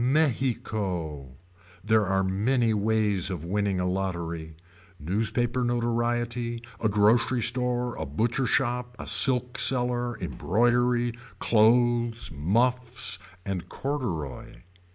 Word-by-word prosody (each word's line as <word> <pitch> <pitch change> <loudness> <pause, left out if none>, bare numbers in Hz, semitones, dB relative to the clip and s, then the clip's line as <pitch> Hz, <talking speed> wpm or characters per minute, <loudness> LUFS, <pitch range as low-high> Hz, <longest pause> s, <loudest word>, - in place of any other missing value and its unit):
Mexico. 105 - -1 0.5
There 110 -1 +2
are 95 0 +1
many 110 +5 +1
ways 105 -2 +1
of 85 -4 -5
winning 100 +1 -1
a 90 - -1
lottery. 85 -4 -3 0.4
Newspaper 115 - -1
notoriety. 120 0 -1 0.2
A 110 - +1
grocery 110 +4 +2
store. 125 0 -1
A - - -4
butcher 115 - -1
shop. 125 -1 -1
A - - -7
silk 125 -2 +2
seller. 125 -1 +4
Embroidery. 120 - +1 0.2
Clothes. 120 0 +2
Muffs. 120 - 0 0.3
And 90 -3 -4
corduroy. 120 - -5
115 Hz, 100 wpm, -26 LUFS, 95-120 Hz, 0.5 s, seller